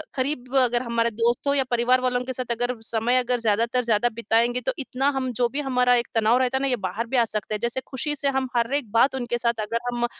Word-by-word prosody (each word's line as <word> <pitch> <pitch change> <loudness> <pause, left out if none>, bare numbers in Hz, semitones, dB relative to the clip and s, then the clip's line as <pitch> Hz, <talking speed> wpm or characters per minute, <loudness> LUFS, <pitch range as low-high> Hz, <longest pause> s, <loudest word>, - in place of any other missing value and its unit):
करीब 260 -1 -2
अगर 245 -2 +3
हमारे 235 -1 0
दोस्त 235 +5 0
हो 280 - +3
या 275 -1 +2
परिवार 245 +2 +3
वालों 250 -1 0
के 260 - -4
साथ 250 -1 -4
अगर 245 +2 -1
समय 230 +2 +1
अगर 250 0 +1
ज़्यादातर 230 +3 +1
ज़्यादा 230 +1 +2
बिताएँगे, 235 +2 +1
तो - - -1
इतना 270 +1 0
हम 260 -1 -1
जो 245 0 +1
भी 280 - -4
हमारा 250 -2 +2
एक 235 -1 0
तनाव 225 +2 +4
रहता 260 0 +1
है 265 - -3
ना, 275 - +1
ये 255 - +1
बाहर 200 +2 -4
भी 255 - -1
आ 235 - +4
सकते 215 -2 -4
है। 210 - -4
जैसे 235 +3 -2
खुशी 295 +3 -3
से 280 0 -2
हम 265 -1 -1
हर 235 +3 +1
एक 260 -8 -3
बात 235 +5 +3
उनके 240 -2 -2
साथ 235 -2 -1
अगर 230 +2 -2
हम 240 0 -1
245 Hz, 260 wpm, -24 LUFS, 230-255 Hz, -, तनाव